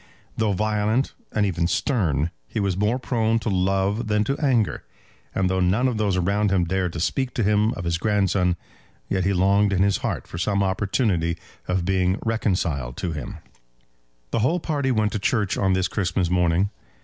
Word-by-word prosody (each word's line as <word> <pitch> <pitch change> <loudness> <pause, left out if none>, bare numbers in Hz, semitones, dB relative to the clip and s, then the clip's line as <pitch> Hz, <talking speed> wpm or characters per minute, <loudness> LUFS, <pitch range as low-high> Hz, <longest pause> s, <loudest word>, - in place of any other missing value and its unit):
Though 110 -2 +1
violent, 110 +5 0 0.2
and 105 -1 +1
even 85 -3 0
stern, 90 - 0 0.2
he - - -3
was 100 -3 0
more 105 +5 +1
prone 115 -3 0
to 115 - -2
love 95 +4 0
than 105 0 +2
to 135 +6 -1
anger; 125 - +1 0.5
and 95 -1 +2
though 95 0 0
none 95 +8 +2
of 125 -3 -1
those 100 -3 +1
around 100 +3 +1
him 95 -2 +2
dared 90 0 -1
to 85 - -4
speak 130 - -1
to 115 - +1
him 105 +2 +3
of 95 - -6
his 85 0 -1
grandson, 95 -3 +1 0.5
yet 95 -2 0
he 100 - +2
longed 100 +2 +3
in 95 0 +2
his 100 0 +2
heart - - -3
for 85 - -7
some 100 +2 +1
opportunity 95 -3 0 0.3
of 90 -1 0
being 95 0 +1
reconciled 85 - -1
to 85 - -2
him. 75 -5 -6 0.9
The - - +1
whole 155 +11 +2
party 145 -5 -1
went 110 -4 +1
to 105 - -2
church 105 -1 0
on 95 -1 +1
this 95 0 +1
Christmas 90 -3 -1
morning. 90 +2 +2
100 Hz, 185 wpm, -24 LUFS, 90-110 Hz, 0.9 s, him